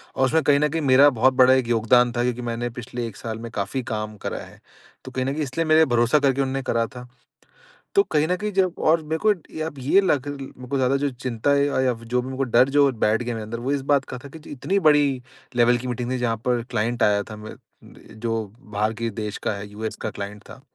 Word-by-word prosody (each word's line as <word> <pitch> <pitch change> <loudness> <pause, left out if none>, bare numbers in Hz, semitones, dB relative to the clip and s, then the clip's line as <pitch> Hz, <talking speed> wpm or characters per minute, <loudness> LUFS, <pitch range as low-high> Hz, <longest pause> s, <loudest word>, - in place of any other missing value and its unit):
और 130 - +3
उसमें 160 +5 +2
कहीं 140 -1 +4
न 150 - +3
कहीं 165 +2 -2
मेरा 140 0 +6
बहुत 130 0 +2
बड़ा 130 0 +6
एक 130 -2 +1
योगदान 120 +1 +3
था 120 - +2
क्योंकि 125 0 -1
मैंने 120 +1 -3
पिछले 120 0 -5
1 110 - -10
साल 110 -1 -6
में 115 - -8
काफ़ी 110 +6 -3
काम 110 0 -4
करा - - -2
है। - - -16 0.5
तो - - -8
कहीं 130 0 -2
न 135 - -1
कहीं 155 +1 -2
इसलिए 150 +4 -2
मेरे 160 0 +5
भरोसा 120 +2 +3
करके 140 -1 +2
उन्होंने 135 0 -1
करा 115 -2 0
था। 125 0 -9 0.9
तो 400 - +6
कहीं 150 +1 +2
न 180 - +1
कहीं 210 +3 -3
जब 185 -2 +2
और 160 +1 +4
मेरे 160 - 0
को 215 - +6 0.6
ये 195 - +6
लग 145 -8 0
मेरे 135 -3 -8
को 140 - 0
ज़्यादा 130 0 +2
जो 140 +1 0
चिंता 125 +1 -2
है 140 0 +3
या 130 -3 +1
जो 115 +2 -2
भी 125 - -7
मेरे 130 0 -6
को 135 - +1
डर 125 +1 +4
जो 140 0 +4
बैठ 110 -1 +1
गया 120 0 -3
मेरे 110 - -5
अंदर 115 +2 -5
वो 135 - 0
इस 140 -1 0
बात 140 -2 +3
का - - -7
था 140 - -9
की 155 - -14
इतनी 160 +8 -1
बड़ी 145 -3 +3 0.3
लेवल 120 0 +4
की 125 +1 -6
मीटिंग 125 0 -3
थी 130 - 0
जहाँ 120 -2 -1
पर 120 -2 +1
क्लाइंट 115 +3 0
आया 100 -1 +3
था 110 - -9
म 105 0 -10
अ, - - -9 0.6
जो 115 0 -2 0.2
बाहर 110 -2 -2
के 115 0 -1
देश 105 -1 -5
का - - 0
है 100 0 -7
यूएस 110 +1 -5
का - - -2
क्लाइंट 100 +1 -7
था। 130 - -12
125 Hz, 255 wpm, -23 LUFS, 115-140 Hz, 0.9 s, मेरा